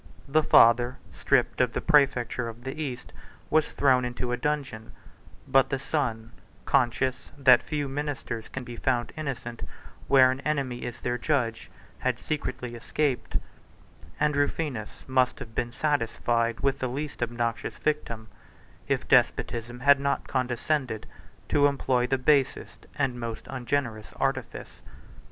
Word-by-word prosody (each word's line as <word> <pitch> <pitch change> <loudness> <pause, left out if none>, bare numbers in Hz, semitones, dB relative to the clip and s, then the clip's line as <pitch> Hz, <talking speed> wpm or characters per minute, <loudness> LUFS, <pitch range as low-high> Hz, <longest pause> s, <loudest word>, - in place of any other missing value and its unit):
The 155 +3 +3
father, 120 -2 +5 0.2
stripped - - +1
of - - +1
the - - -1
præfecture 125 -4 +2
of 115 +1 -11
the 135 +4 -5
East, 130 -5 -5 0.4
was 155 -1 +3
thrown 130 -3 +3
into 125 0 -3
a - - +1
dungeon; 135 -5 -3 0.5
but 135 0 +4
the 135 - 0
son, 120 -6 -2 0.3
conscious 130 0 +1
that 130 -3 +6
few 145 -2 -3
ministers 135 -5 -4
can 130 - -6
be 120 -1 -8
found 120 -1 0
innocent, 130 -6 -5 0.5
where 130 -1 +6
an 130 - -4
enemy 140 -5 -2
is 120 0 -6
their 125 0 -1
judge, 120 -4 -1 0.3
had - - 0
secretly 125 -5 -4
escaped; 130 +3 -1 0.8
and 150 -1 +2
Rufinus 145 -6 -2
must 130 -1 +2
have 115 - -9
been 120 0 -2
satisfied 115 -4 0
with 135 0 +1
the 130 - -1
least 145 +2 -5
obnoxious 120 -1 -2
victim, 115 -7 -2 0.6
if - - -1
despotism 120 +1 +1
had 140 +1 +6
not 140 0 -1
condescended 125 -1 -1 0.4
to 145 -1 +5
employ 130 -3 +1
the 135 - +1
basest 135 +1 +1
and 135 -4 -1
most 115 -2 -5
ungenerous 120 -4 -2
artifice. - - -3
130 Hz, 135 wpm, -27 LUFS, 120-140 Hz, 0.8 s, that